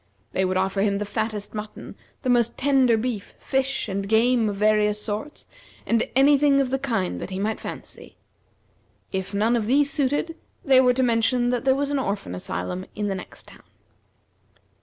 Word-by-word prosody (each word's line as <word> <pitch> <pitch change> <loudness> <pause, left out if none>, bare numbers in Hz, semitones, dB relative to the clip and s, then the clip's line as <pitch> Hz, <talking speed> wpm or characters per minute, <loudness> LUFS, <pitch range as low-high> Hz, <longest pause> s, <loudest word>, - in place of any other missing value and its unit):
They 190 - 0
would 185 0 0
offer 190 +1 0
him 200 -1 +1
the 210 - -3
fattest 205 0 -3
mutton, 210 0 -7 0.3
the 255 - -1
most 235 -2 +2
tender 265 -4 +3
beef, 220 -3 -4
fish, 265 -1 -1
and 195 0 -3
game 230 0 +3
of 205 - -3
various 210 0 +2
sorts, 215 +8 -5 0.4
and 230 0 +1
any 275 +1 +5
thing 280 -1 +4
of 265 -2 0
the 270 - 0
kind 225 -9 -2
that - - -5
he 185 - -5
might 210 +3 -2
fancy. - - -9 0.9
If 190 0 -3
none 220 +4 +2
of 220 -3 -1
these 280 +3 +3
suited, 290 +4 0 0.3
they 265 -2 +6
were 250 -1 +3
to 260 - +2
mention 240 +1 +2
that 245 +1 -2
there 265 -1 +4
was 285 +1 -1
an 285 - +1
orphan 200 - -3
asylum 90 - -5
in 210 -1 -2
the - - -1
next 190 - -9
town. - - -16
225 Hz, 185 wpm, -24 LUFS, 205-265 Hz, 0.9 s, they